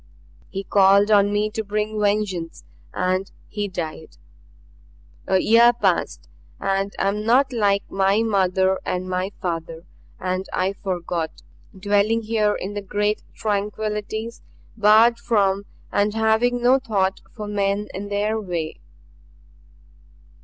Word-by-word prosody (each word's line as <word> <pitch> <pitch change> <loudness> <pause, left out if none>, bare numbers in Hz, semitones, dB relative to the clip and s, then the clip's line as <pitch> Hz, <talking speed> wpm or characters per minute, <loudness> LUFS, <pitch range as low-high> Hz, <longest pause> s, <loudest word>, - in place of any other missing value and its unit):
He 195 0 -5
called 200 +2 +4
on 205 -1 +5
me 210 +1 0
to 220 0 -3
bring 210 +1 -2
vengeance 200 -5 -1 0.3
and 185 +1 -1 0.2
he 205 -1 -3
died. 160 -4 -6 1.1
A 190 - +3
year 235 +5 +5
passed 190 - -1 0.3
and 195 0 -1
I 195 - 0
am 210 +1 -3
not 255 +4 +3
like 200 -3 +2
my 195 +3 +2
mother 190 -3 +1
and 180 0 -3
my 185 +1 -2
father 165 -2 -4 0.4
and 185 +1 -3
I 185 +2 0
forgot 175 -4 -4 0.4
dwelling 205 +3 +1
here 215 -1 +1
in 195 +2 -5
the 205 - -4
great 205 +2 -1
tranquillities, 210 +2 -3 0.3
barred 220 +2 +5
from 200 -4 +1 0.3
and 205 +1 +1
having 225 +2 +2
no 255 +2 +5
thought 195 -7 -1
for 210 -3 -6
men 205 0 -1
and 200 +2 -6
their 210 +2 0
way. 170 -5 -4
205 Hz, 125 wpm, -22 LUFS, 190-215 Hz, 1.1 s, on